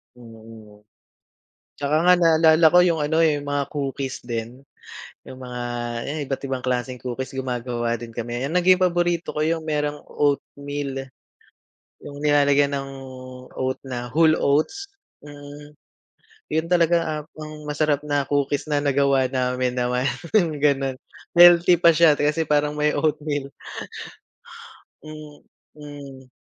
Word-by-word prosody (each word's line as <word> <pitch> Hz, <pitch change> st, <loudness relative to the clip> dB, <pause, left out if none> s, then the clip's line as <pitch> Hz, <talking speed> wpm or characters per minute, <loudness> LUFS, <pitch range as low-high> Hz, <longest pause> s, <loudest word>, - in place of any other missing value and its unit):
Mm. 110 Hz, -3 st, -15 dB, 0.9 s
Tsaka 145 Hz, +1 st, -1 dB
nga 180 Hz, -, +7 dB
naalala 160 Hz, -2 st, +5 dB
ko 180 Hz, +2 st, +5 dB
yung 165 Hz, -3 st, +1 dB
ano, 155 Hz, +2 st, 0 dB
eh, 160 Hz, -2 st, +4 dB
yung 145 Hz, -, -7 dB
mga 145 Hz, -1 st, -1 dB
cookies 135 Hz, -2 st, -4 dB
din, 120 Hz, +1 st, -6 dB, 0.6 s
yung 130 Hz, -, -11 dB
mga 125 Hz, -1 st, -7 dB, 0.4 s
ayan, 150 Hz, +3 st, -4 dB
iba't 135 Hz, -, -3 dB
ibang 135 Hz, -2 st, -3 dB
klaseng 125 Hz, 0 st, -2 dB
cookies, 130 Hz, +1 st, -5 dB
gumagawa 120 Hz, -2 st, -3 dB
din 115 Hz, 0 st, -9 dB
kami. 120 Hz, +2 st, -5 dB
Yung 140 Hz, -, -3 dB
naging 180 Hz, +1 st, +4 dB
paborito 175 Hz, -1 st, 0 dB
ko -, -, -5 dB
yung 160 Hz, +1 st, 0 dB
merong 150 Hz, -1 st, -2 dB
oatmeal. 140 Hz, -1 st, -3 dB, 1.0 s
Yung 145 Hz, -, -9 dB
nilalagyan 145 Hz, -1 st, +3 dB
ng 135 Hz, 0 st, -4 dB, 0.7 s
oat 130 Hz, 0 st, -1 dB
na 120 Hz, -2 st, -5 dB
whole 160 Hz, +2 st, +4 dB
oats, 155 Hz, -, 0 dB, 0.3 s
mm, 145 Hz, 0 st, -12 dB, 0.7 s
yun 160 Hz, +1 st, 0 dB
talaga, 170 Hz, -1 st, +3 dB
ah, 155 Hz, -1 st, -3 dB
pang 155 Hz, -1 st, -9 dB
masarap 150 Hz, -1 st, 0 dB
na 145 Hz, -1 st, +1 dB
cookies 145 Hz, 0 st, 0 dB
na 145 Hz, -, +3 dB
nagawa 140 Hz, -2 st, +2 dB
namin 125 Hz, -1 st, -1 dB
naman, 125 Hz, +1 st, 0 dB, 0.3 s
yung 170 Hz, -8 st, +2 dB
gano'n. 135 Hz, -2 st, +1 dB, 0.4 s
Healthy 175 Hz, 0 st, +7 dB
pa 170 Hz, -, +8 dB
siya, 160 Hz, -1 st, +5 dB
kasi 150 Hz, +3 st, 0 dB
parang 150 Hz, 0 st, +2 dB
may 150 Hz, 0 st, +1 dB
oatmeal. 145 Hz, -2 st, -2 dB, 1.5 s
Mm. 145 Hz, -2 st, -12 dB
145 Hz, 130 wpm, -22 LUFS, 130-155 Hz, 1.5 s, pa